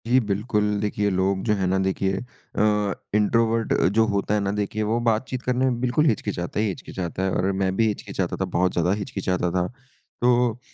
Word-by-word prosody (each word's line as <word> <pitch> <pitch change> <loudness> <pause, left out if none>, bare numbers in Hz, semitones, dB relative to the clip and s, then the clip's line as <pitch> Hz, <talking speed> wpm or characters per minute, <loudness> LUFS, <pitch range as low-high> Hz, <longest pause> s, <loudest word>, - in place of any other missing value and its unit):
जी 125 +2 +5
बिल्कुल 105 +2 0 0.2
देखिए 105 -1 0
लोग 95 0 +1
जो 105 - +3
है 95 -2 -1
ना 95 +1 +1
देखिए 95 0 0 0.4
अ, 105 -2 +2 0.2
इंट्रोवर्ट 115 +1 +2 0.2
जो 115 - +6
होता 100 +1 0
है 105 - +3
ना 100 0 0
देखिए 105 +1 -1
वो 115 - +2
बातचीत 120 +3 0
करने 125 +1 +1
में 125 -2 0
बिल्कुल 125 +5 +2
हिचकिचाता 100 - -1
ही 110 - +2
हिचकिचाता 95 -1 -4
है 95 - +1
और 95 +1 +1
मैं 95 -1 +1
भी 115 +2 +3
हिचकिचाता 100 -3 -2
था 95 - -1
बहुत 90 +1 +3
ज़्यादा 85 +1 +1
हिचकिचाता 90 -3 -1
था। 90 0 0 0.5
तो 120 -1 +3
105 Hz, 190 wpm, -24 LUFS, 95-115 Hz, 0.5 s, जो